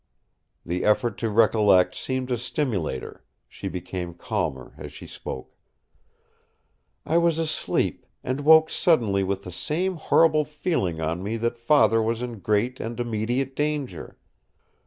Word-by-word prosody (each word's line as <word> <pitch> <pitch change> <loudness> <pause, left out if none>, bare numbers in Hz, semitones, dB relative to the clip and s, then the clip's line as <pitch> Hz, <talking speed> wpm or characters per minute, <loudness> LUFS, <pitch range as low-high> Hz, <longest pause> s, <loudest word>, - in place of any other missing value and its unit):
The 90 +2 -2
effort 105 0 +1
to 115 - -1
recollect 105 -4 +4
seemed 130 -1 -3
to 125 - 0
stimulate 110 - -2
her; - - -11 0.2
she - - -7
became 90 -1 -5
calmer 65 -6 -3
as - - -9
she - - -11
spoke: 65 - -8 1.5
"I 165 - +3
was 170 -2 +2
asleep, 160 -1 -1 0.2
and 130 +3 -2
woke 160 +1 +6
suddenly 110 - +2
with 100 +1 -2
the 90 - -8
same 175 - -2
horrible 155 -1 +4
feeling 150 - -2
on 80 +2 -2
me 105 +4 -3
that 115 +1 -2
Father 115 -3 +4
was 115 +2 -1
in 120 -3 -6
great 105 +6 0
and 115 +1 -5
immediate 120 +3 -1
danger. 150 -3 -3
115 Hz, 140 wpm, -25 LUFS, 100-150 Hz, 1.5 s, woke